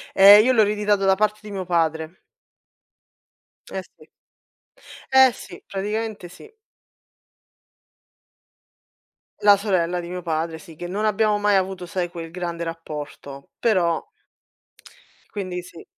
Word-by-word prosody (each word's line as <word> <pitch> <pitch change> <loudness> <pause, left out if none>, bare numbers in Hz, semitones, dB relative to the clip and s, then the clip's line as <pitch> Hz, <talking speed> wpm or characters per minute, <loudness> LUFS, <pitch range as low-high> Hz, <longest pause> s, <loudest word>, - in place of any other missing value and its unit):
Ehm, 200 +2 +9
io 255 - +4
l'ho 220 -3 +5
ereditato 210 -1 +1
da 190 0 +5
parte 210 +1 0
di 210 - -10
mio 190 -2 -4
padre. 165 -1 -1 1.5
Eh - - -4
sì. - - -21 1.1
Eh 265 -2 +7
sì, 175 -5 -11
praticamente 210 -1 -4
sì. 430 - -15 2.9
La 205 -1 +7
sorella 180 -4 0
di 170 - -8
mio 180 0 -6
padre, 160 0 -2
sì, 165 -1 -14
che 175 - -6
non 205 +4 -3
abbiamo 210 0 +2
mai 205 0 +2
avuto 190 -1 -2
sai, 175 0 -3
quel 165 -2 -8
grande 170 -1 -4
rapporto, 150 -4 -8
però 180 -7 +1 1.3
quindi 185 -3 -4
sì. 170 -2 -13
185 Hz, 125 wpm, -22 LUFS, 170-210 Hz, 2.9 s, Ehm